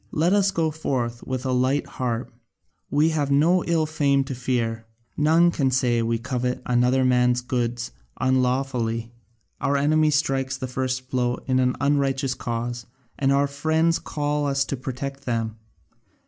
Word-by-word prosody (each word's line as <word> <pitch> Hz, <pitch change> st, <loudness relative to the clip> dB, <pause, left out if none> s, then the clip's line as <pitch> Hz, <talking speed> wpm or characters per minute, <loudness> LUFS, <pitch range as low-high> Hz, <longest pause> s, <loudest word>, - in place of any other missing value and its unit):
Let 170 Hz, +5 st, +2 dB
us 200 Hz, -1 st, +3 dB
go 165 Hz, -4 st, 0 dB
forth 125 Hz, -6 st, -2 dB
with 130 Hz, 0 st, -3 dB
a 130 Hz, -, 0 dB
light 130 Hz, +3 st, +1 dB
heart; 120 Hz, -2 st, -4 dB, 0.6 s
we 150 Hz, +3 st, +3 dB
have 150 Hz, -3 st, -1 dB
no 165 Hz, +6 st, +3 dB
ill 165 Hz, -2 st, +1 dB
fame 140 Hz, -3 st, +1 dB
to 135 Hz, -, -5 dB
fear: 115 Hz, -3 st, -2 dB, 0.3 s
none 165 Hz, +3 st, +4 dB
can 140 Hz, -5 st, +1 dB
say 125 Hz, -2 st, +1 dB
we 115 Hz, 0 st, 0 dB
covet 125 Hz, +1 st, -2 dB
another 125 Hz, +2 st, +2 dB
man's 125 Hz, -1 st, +3 dB
goods 120 Hz, -1 st, -2 dB, 0.3 s
unlawfully. 125 Hz, -3 st, 0 dB, 0.5 s
Our 140 Hz, 0 st, +1 dB
enemy 155 Hz, +2 st, +3 dB
strikes 135 Hz, -3 st, 0 dB
the 130 Hz, -, -4 dB
first 130 Hz, 0 st, -3 dB
blow 125 Hz, -1 st, +1 dB
in 130 Hz, -1 st, +1 dB
an 125 Hz, 0 st, +2 dB
unrighteous 140 Hz, -2 st, +1 dB
cause, 120 Hz, -1 st, -4 dB, 0.3 s
and 135 Hz, -1 st, +2 dB
our 140 Hz, +1 st, +3 dB
friends 160 Hz, +4 st, +1 dB
call 145 Hz, -1 st, -2 dB
us 135 Hz, -1 st, +1 dB
to 135 Hz, -, -3 dB
protect 135 Hz, +2 st, -6 dB
them. 115 Hz, -2 st, -2 dB
130 Hz, 155 wpm, -24 LUFS, 125-145 Hz, 0.6 s, none